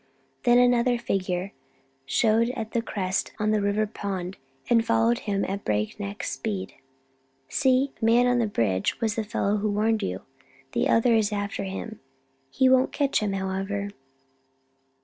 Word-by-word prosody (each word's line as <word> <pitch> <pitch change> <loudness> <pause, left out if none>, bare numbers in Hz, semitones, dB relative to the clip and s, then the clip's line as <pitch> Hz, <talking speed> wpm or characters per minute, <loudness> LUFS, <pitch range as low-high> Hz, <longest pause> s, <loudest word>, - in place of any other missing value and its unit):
Then 240 0 +6
another 245 0 +4
figure 190 -4 -2 0.5
showed 225 - +3
at 220 -1 -4
the 235 - 0
crest 190 -4 -2
on 215 0 0
the 215 -1 +2
River 205 +2 +1 0.2
Road 190 -2 -3 0.3
and 230 -1 +4
followed 230 +1 +2
him 200 -1 0
at 200 +1 -4
breakneck 200 - -2
speed. 200 -4 -3 0.8
"See 265 0 +2
the - - -1
man 240 +2 +5
on 245 0 +3
the 230 - +1
bridge 100 - 0
was 225 -3 0
the 225 - -2
fellow 210 -1 0
who 210 +1 -1
warned 215 +2 +1
you. 90 +1 -3 0.5
The - - 0
other 230 +1 +4
is 220 -2 +2
after 205 -1 -3
him. 200 +3 -6 0.5
He 260 - +2
won't 260 0 +4
catch 280 -1 +1
him, 210 -2 -1
however." 195 +1 -3
215 Hz, 155 wpm, -26 LUFS, 195-230 Hz, 0.8 s, Then